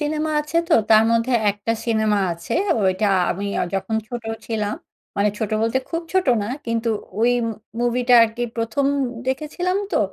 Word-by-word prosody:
Cinema 305 Hz, +1 st, -1 dB
আছে, 300 Hz, +2 st, -4 dB
তো 330 Hz, -, +5 dB, 0.2 s
তার 215 Hz, 0 st, +7 dB
মধ্যে 230 Hz, +2 st, +1 dB, 0.2 s
একটা 205 Hz, +3 st, -2 dB
সিনেমা 220 Hz, -2 st, +2 dB
আছে 170 Hz, +7 st, -5 dB, 0.3 s
ঐটা 190 Hz, +2 st, +2 dB, 0.2 s
আমি 200 Hz, +3 st, -3 dB
অ -, -, +1 dB
যখন 195 Hz, +3 st, -1 dB
ছোটো 235 Hz, -2 st, -6 dB, 0.2 s
ছিলাম। 215 Hz, -2 st, -2 dB, 0.4 s
মানে 200 Hz, +1 st, +3 dB
ছোট 220 Hz, -, -2 dB
বলতে 230 Hz, +3 st, +1 dB
খুব 330 Hz, 0 st, -2 dB
ছোটো 370 Hz, -8 st, +3 dB
না, 205 Hz, -, -3 dB, 0.2 s
কিন্তু 230 Hz, 0 st, -1 dB, 0.3 s
ঐ -, -, +2 dB, 0.6 s
মুভিটা 245 Hz, +1 st, +2 dB
আরকি 230 Hz, +1 st, -1 dB
১ম 230 Hz, +5 st, 0 dB, 0.4 s
দেখেছিলাম 305 Hz, +7 st, -1 dB, 0.2 s
তো, -, -, +3 dB
230 Hz, 160 wpm, -21 LUFS, 215-270 Hz, 0.6 s, তার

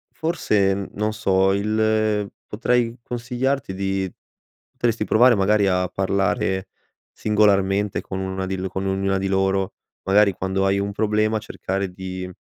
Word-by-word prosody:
forse, 105 Hz, -, +1 dB
n 100 Hz, 0 st, -5 dB
non 105 Hz, +1 st, -2 dB
so, 95 Hz, -2 st, +2 dB
il 110 Hz, 0 st, +1 dB, 0.2 s
potrei 120 Hz, +2 st, 0 dB
consigliarti 125 Hz, 0 st, -2 dB
di 95 Hz, -1 st, -2 dB, 0.6 s
potresti 115 Hz, -2 st, 0 dB
provare 120 Hz, +3 st, +5 dB
magari 100 Hz, +1 st, +3 dB
a 90 Hz, -1 st, +1 dB
parlare 95 Hz, 0 st, 0 dB, 0.4 s
singolarmente 105 Hz, -2 st, +2 dB
con 95 Hz, -, -6 dB
1 95 Hz, 0 st, -3 dB
di 95 Hz, 0 st, -2 dB
l 95 Hz, +1 st, -3 dB
con 95 Hz, +1 st, -3 dB
ognuna 95 Hz, 0 st, 0 dB
di 95 Hz, -, -1 dB
loro, 95 Hz, 0 st, 0 dB, 0.3 s
magari 100 Hz, +1 st, +4 dB
quando 95 Hz, +2 st, -1 dB
hai 95 Hz, 0 st, +2 dB
un 100 Hz, 0 st, -2 dB
problema, 110 Hz, +1 st, +1 dB
cercare 100 Hz, -2 st, -3 dB
di, 95 Hz, 0 st, -6 dB
100 Hz, 140 wpm, -22 LUFS, 95-110 Hz, 0.6 s, provare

